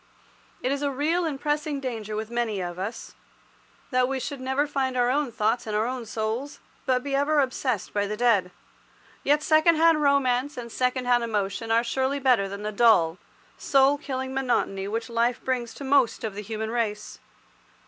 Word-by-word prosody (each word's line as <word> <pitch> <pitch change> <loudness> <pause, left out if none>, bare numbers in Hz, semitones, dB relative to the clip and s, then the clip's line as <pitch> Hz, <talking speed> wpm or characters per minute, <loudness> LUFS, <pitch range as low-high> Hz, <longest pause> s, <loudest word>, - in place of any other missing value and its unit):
It 255 - +1
is 280 0 -1
a 285 - +1
real 310 +6 0
and 310 -3 -2
a - - -10
pressing 295 -1 -1
danger 225 -5 -4
with 220 +1 -4
many 235 -4 -1
of 175 -1 -5
us, 205 +5 -5 0.8
that 255 -1 +3
we 270 0 -2
should 275 +1 -5
never 265 +3 0
find 270 -3 -1
our 245 0 +3
own 280 -2 0
thoughts 225 +2 0
and 215 - -2
our 215 +1 +1
own 250 -1 -4
souls, 225 +6 -3 0.3
but 255 -1 +2
be 280 - -4
ever 290 +2 +2
obsessed 255 -5 -1
by 205 -1 0
the 210 +1 -4
dead. 215 -6 +3 0.7
Yet 295 +1 +2
second 315 +2 +4
hand 325 -1 +4
romance 280 -1 +2
and 235 -1 -6
second 250 +1 0
hand 245 -1 +3
emotion 215 0 -2
are 230 +1 +3
surely 265 +3 -1
better 250 -8 +2
than 200 +1 -7
the 210 - -2
dull, 200 -7 +4 0.4
soul 275 +1 +3
killing 265 -2 -4
monotony 235 -7 0
which 225 +2 -3
life 235 +1 0
brings 250 -3 -1
to - - -8
most 270 -4 +2
of 220 -3 -3
the 205 - -6
human 220 +1 -4
race. 215 -3 -3
250 Hz, 190 wpm, -26 LUFS, 220-275 Hz, 0.8 s, second